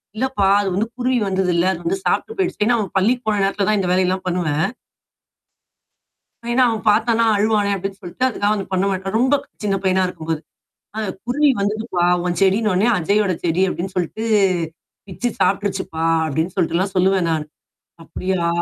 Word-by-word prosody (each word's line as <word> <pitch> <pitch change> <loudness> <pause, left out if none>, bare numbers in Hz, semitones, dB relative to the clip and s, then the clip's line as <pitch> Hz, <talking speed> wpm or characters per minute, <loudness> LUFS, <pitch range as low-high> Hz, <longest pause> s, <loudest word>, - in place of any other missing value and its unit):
"இல்லப்பா 215 -5 0
அது 200 - -1
வந்து 215 +4 0
குருவி 250 0 +1
வந்ததுல்ல, 185 -2 +1
அது 175 - -7
வந்து 190 +3 0
சாப்ட்டுப் 445 - -1
போய்டுச்சுன்னு" 355 - 0
ஏன்னா 240 0 +3
அவன் 200 -3 -4
பள்ளிக்கு 240 +6 +1
போன 210 -1 +1
நேரத்தில 200 0 0
தான் 215 -1 +2
இந்த 180 - -1
வேலை 185 0 +3
எல்லாம் 185 +1 -2
பண்ணுவேன். 170 -2 0 1.9
ஏன்னா 255 +2 +4
அவன் 220 -2 -2
பாத்தான்ன்னா, 230 +2 +2
அழுவானே 210 0 +2
அப்டின்னு 195 +1 -5
சொல்ட்டு, 180 +9 -3
அதுக்காக 205 -3 0
வந்து 200 -2 -4
பண்ண 185 +1 +1
மாட்டான். 195 +1 -3
ரொம்ப 260 +4 +3 0.3
சின்ன 200 -2 0
பையனா 190 0 +2
இருக்கும்போது, 160 -3 -4 0.6
அ - - -1 0.3
"குருவி 285 +5 +2
வந்துதுப்பா, 205 -2 -1 0.2
உன் 175 -1 -1
செடின்னோன்னே, 195 +1 +3
அஜய்யோட 200 +3 +1
செடி 175 +2 +1
அப்டின்னு 185 +2 -5
சொல்ட்டு, 180 +5 -2 0.8
பிச்சு 220 +6 -3
சாப்ட்ருச்சுப்பா" 190 -5 0 0.2
அப்டின்னு 160 +4 -2
சொல்ட்டுல்லாம் 185 +2 0
சொல்லுவேன் 185 -2 +2
நானு. 155 -1 -2 0.6
"அப்படியா?" 185 0 -2
195 Hz, 160 wpm, -20 LUFS, 180-215 Hz, 1.9 s, ஏன்னா